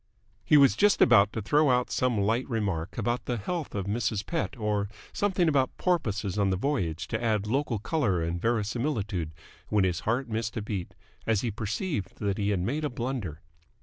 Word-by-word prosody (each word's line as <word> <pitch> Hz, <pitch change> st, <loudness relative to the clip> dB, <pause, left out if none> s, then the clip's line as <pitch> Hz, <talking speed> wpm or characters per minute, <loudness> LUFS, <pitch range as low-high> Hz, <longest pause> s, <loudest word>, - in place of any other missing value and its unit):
He 150 Hz, -, +5 dB
was 140 Hz, -2 st, +6 dB
just 205 Hz, 0 st, +4 dB
about 105 Hz, -4 st, +6 dB
to 110 Hz, -, -3 dB
throw 150 Hz, +6 st, +3 dB
out 125 Hz, -1 st, +2 dB
some 125 Hz, -3 st, +1 dB
light 110 Hz, +6 st, +1 dB
remark 100 Hz, -6 st, -2 dB
about 120 Hz, +1 st, -1 dB
the 120 Hz, -, -1 dB
health 155 Hz, -, -4 dB
of 100 Hz, -2 st, -2 dB
Mrs. 105 Hz, 0 st, -1 dB
Pett 165 Hz, -5 st, -2 dB
or 105 Hz, -2 st, -1 dB, 0.2 s
something 190 Hz, -4 st, +1 dB
about 135 Hz, -4 st, +1 dB
porpoises 105 Hz, -, 0 dB
on 100 Hz, -1 st, +3 dB
the 95 Hz, -, +1 dB
voyage 90 Hz, -, -1 dB
to -, -, -2 dB
add 110 Hz, -3 st, +1 dB
local 130 Hz, +1 st, 0 dB
colour 105 Hz, -, 0 dB
and 85 Hz, +1 st, -2 dB
verisimilitude, 110 Hz, -, -1 dB, 0.4 s
when 105 Hz, -2 st, +3 dB
his 90 Hz, -2 st, +1 dB
heart 120 Hz, +7 st, -1 dB
missed 110 Hz, 0 st, -3 dB
a -, -, -1 dB
beat, 100 Hz, -4 st, -4 dB, 0.3 s
as 110 Hz, -3 st, +2 dB
he 120 Hz, -, -1 dB
perceived 110 Hz, -, -3 dB
that 100 Hz, -1 st, -1 dB
he 100 Hz, 0 st, +1 dB
had 100 Hz, -3 st, +1 dB
made 140 Hz, +11 st, -1 dB
a 150 Hz, -, 0 dB
blunder. 120 Hz, -, -4 dB
110 Hz, 190 wpm, -28 LUFS, 100-130 Hz, 0.4 s, was